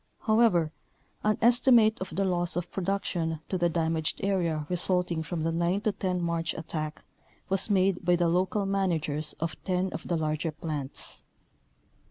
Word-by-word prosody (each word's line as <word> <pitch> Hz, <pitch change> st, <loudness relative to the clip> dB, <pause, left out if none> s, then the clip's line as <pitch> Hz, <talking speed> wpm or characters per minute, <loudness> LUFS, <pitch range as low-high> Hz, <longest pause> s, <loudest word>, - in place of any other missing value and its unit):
However, 215 Hz, -8 st, +3 dB, 0.5 s
an 215 Hz, 0 st, +2 dB
estimate 235 Hz, -2 st, +5 dB
of 185 Hz, -4 st, -5 dB
the 195 Hz, +2 st, +1 dB
loss 175 Hz, -2 st, 0 dB
of 175 Hz, 0 st, -3 dB
production 175 Hz, -4 st, -1 dB
to 185 Hz, -, 0 dB
the 175 Hz, 0 st, +3 dB
damaged 160 Hz, -1 st, 0 dB
area 170 Hz, -6 st, 0 dB
resulting 180 Hz, -2 st, 0 dB
from 160 Hz, 0 st, -3 dB
the 165 Hz, -, +1 dB
9 170 Hz, +3 st, +1 dB
10 190 Hz, -4 st, -1 dB
March 170 Hz, 0 st, -1 dB
attack 155 Hz, -1 st, -5 dB, 0.5 s
was 195 Hz, +3 st, +2 dB
made 190 Hz, -2 st, +2 dB
by 180 Hz, -, +4 dB
the 175 Hz, 0 st, +2 dB
local 185 Hz, +4 st, +1 dB
managers 160 Hz, -6 st, 0 dB
of 165 Hz, 0 st, -4 dB
10 185 Hz, 0 st, -1 dB
of 160 Hz, -, -6 dB
the 170 Hz, -, 0 dB
larger 155 Hz, +1 st, -1 dB
plants. 150 Hz, -3 st, -5 dB
175 Hz, 155 wpm, -28 LUFS, 160-195 Hz, 0.5 s, estimate